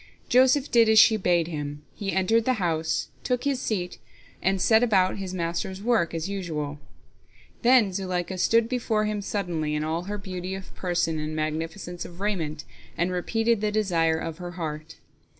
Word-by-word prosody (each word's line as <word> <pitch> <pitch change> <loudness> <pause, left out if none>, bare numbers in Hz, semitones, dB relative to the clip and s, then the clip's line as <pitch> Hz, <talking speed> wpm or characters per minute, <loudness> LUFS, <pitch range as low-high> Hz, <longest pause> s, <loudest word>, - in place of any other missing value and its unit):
Joseph 260 +3 +4
did 230 -2 +5
as 220 - +5
she 220 +1 +8
bade 175 -5 +2
him, 145 -2 -5
he 200 -2 -3
entered 205 +5 +2
the 255 - +3
house, 165 -7 -1
took 250 -1 -1
his 275 -2 0
seat, 180 -5 -3 0.4
and 195 0 +1
set 220 +4 +4
about 195 -6 +3
his 190 -2 -5
master's 180 +1 -3
work 215 -6 +1
as 165 +1 -2
usual. 155 -7 -4 0.8
Then 235 -5 +5
Zuleika 185 -1 -3
stood 230 +4 +3
before 225 -3 0
him 210 -1 -2
suddenly 170 -7 -2
in 150 - -1
all 165 +3 -2
her 205 +1 -4
beauty 190 -2 -5
of 190 0 -9
person 175 -3 -1
and 155 +1 -4
magnificence 160 +3 -3
of 175 0 -11
raiment, 180 -7 -2 0.3
and 175 +2 +1
repeated 225 +5 0
the 210 -1 0
desire 170 -7 +2
of 165 +1 -5
her 175 0 -6
heart. 155 -2 -5
185 Hz, 170 wpm, -26 LUFS, 165-215 Hz, 0.8 s, she